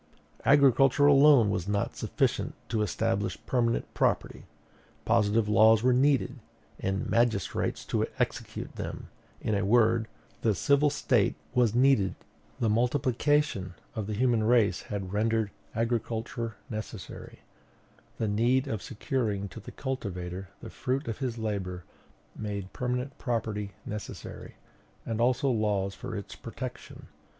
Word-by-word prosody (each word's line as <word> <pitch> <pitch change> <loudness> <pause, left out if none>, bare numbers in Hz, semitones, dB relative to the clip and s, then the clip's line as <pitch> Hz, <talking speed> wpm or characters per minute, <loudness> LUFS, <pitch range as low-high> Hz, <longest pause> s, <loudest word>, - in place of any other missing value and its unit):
"Agriculture 135 0 +5
alone 140 -6 +6
was 90 -2 -2
not 100 0 -1
sufficient - - -1
to 110 -2 0
establish 100 -1 -1
permanent 120 -2 +1
property; - - 0 0.6
positive 110 -1 +3
laws 110 +1 +5
were 125 0 +4
needed, 135 0 +2 0.4
and 95 +1 -1
magistrates 115 -5 0
to - - 0
execute - - -3
them; - - -6 0.3
in 110 - -1
a 100 0 +1
word, 115 +1 +3 0.3
the 110 -3 +2
civil 140 +7 +3
State - - +1 0.2
was 120 -3 +3
needed. 125 -6 +4 0.4
"The 115 - +1
multiplication 125 - +1 0.2
of 110 -3 -4
the 105 - -2
human 120 -1 +2
race 115 -2 +3
had 100 -2 -5
rendered 110 0 +1 0.2
agriculture 115 0 -2
necessary; 110 -4 -7 0.8
the 110 - -1
need 120 +6 +2
of 110 -6 -3
securing 110 -4 -2
to 115 - -9
the 105 - -10
cultivator 95 -8 -5
the - - -8
fruit 130 +3 -2
of 115 - -4
his 125 -4 -2
labor 95 -5 -3 0.5
made 100 -3 -5
permanent 125 +2 -3
property 110 -5 -2
necessary, 105 0 -7 0.5
and 115 0 -2
also 125 +2 +2
laws 105 -4 0
for 110 - -7
its 100 - -7
protection. - - -8
115 Hz, 125 wpm, -29 LUFS, 105-125 Hz, 0.8 s, alone